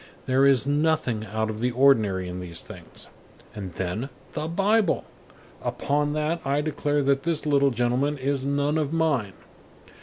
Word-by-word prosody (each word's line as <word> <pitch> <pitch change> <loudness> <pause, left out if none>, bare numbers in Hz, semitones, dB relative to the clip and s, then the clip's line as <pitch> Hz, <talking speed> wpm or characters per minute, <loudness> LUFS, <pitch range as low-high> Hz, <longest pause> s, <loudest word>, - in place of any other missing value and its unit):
There 135 +2 +4
is 135 -2 +4
nothing 145 -7 0
out 110 +2 -2
of 110 - -7
the 125 +2 +1
ordinary 110 -8 +3
in 90 0 -5
these 85 -2 -6
things. - - -11 0.5
And 95 -4 -7
then, 95 +10 -3 0.2
the 155 +1 -3
Bible! 200 +3 +2 0.6
Upon 145 +1 -1
that 155 +2 -1
I 140 +1 +1
declare 145 -1 0
that 135 0 +2
this 160 -1 -1
little 140 -2 +3
gentleman 125 +4 0
is 135 0 -1
none 145 +2 0
of 150 -2 -1
mine. 150 -12 0
140 Hz, 155 wpm, -25 LUFS, 115-150 Hz, 0.6 s, There